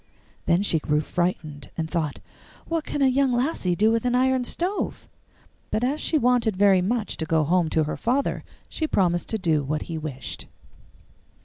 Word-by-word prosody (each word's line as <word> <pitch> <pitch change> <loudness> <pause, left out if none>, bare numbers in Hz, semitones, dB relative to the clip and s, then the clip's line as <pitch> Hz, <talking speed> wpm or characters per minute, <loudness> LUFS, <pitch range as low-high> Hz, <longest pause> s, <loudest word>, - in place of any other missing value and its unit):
Then 175 +3 +3
she 165 -5 +2
grew 150 0 +1
frightened, 155 -2 -3
and 160 -1 -1
thought, 160 -4 -2 0.5
'What 330 -2 -1
can 290 - -1
a - - +6
young 265 0 +2
lassie 240 - 0
do 215 +4 +3
with 230 0 +1
an 245 0 +1
iron 260 0 +2
stove?' 365 +10 -3 0.6
But 220 - -1
as 275 +5 0
she 320 - +1
wanted 245 -5 +2
very 195 -2 +5
much 215 +3 -1
to 160 - -2
go 160 -1 +2
home 170 +1 +2
to 160 - +2
her 150 - -3
father, 260 +4 0 0.2
she 315 - -2
promised 175 - +1
to 220 - 0
do 165 -7 +1
what 150 +2 -2
he 165 -2 -5
wished. 140 -4 -6
195 Hz, 185 wpm, -25 LUFS, 160-250 Hz, 0.6 s, a